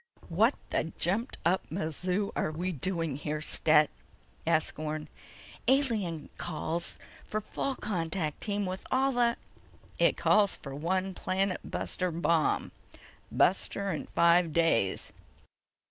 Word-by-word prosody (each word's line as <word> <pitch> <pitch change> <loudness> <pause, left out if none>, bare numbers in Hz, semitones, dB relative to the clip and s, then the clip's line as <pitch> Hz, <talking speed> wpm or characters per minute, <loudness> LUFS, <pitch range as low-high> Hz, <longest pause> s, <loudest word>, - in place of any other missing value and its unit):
"What 215 +10 +3 0.2
the - - +1
jumped 210 - 0
up 180 +3 +3
mazoo 180 +4 -1
are - - 0
we 175 +4 -2
doing 165 -2 -1
here, 150 +1 -3
Stet?" 150 0 +4 0.6
asked 160 -2 +2
Orne. 155 0 -3 0.6
"Alien 220 - +1
calls 170 0 -3 0.3
for 215 - -4
a - - +2
full 270 +5 -2
contact 165 -7 -2
team 205 -1 -1
with 185 0 -5
all 265 +1 +3
of 235 -1 +3 0.6
the—" - - -1
"It - - +4
calls 205 -2 +4
for 135 - -8
one 185 +6 -1
planet 185 +1 0
buster 185 -1 -2
bomb... 165 -1 +1 0.6
buster—in 195 -2 +1
five 170 -1 +4
days. 155 - +2
175 Hz, 125 wpm, -30 LUFS, 155-200 Hz, 0.6 s, Stet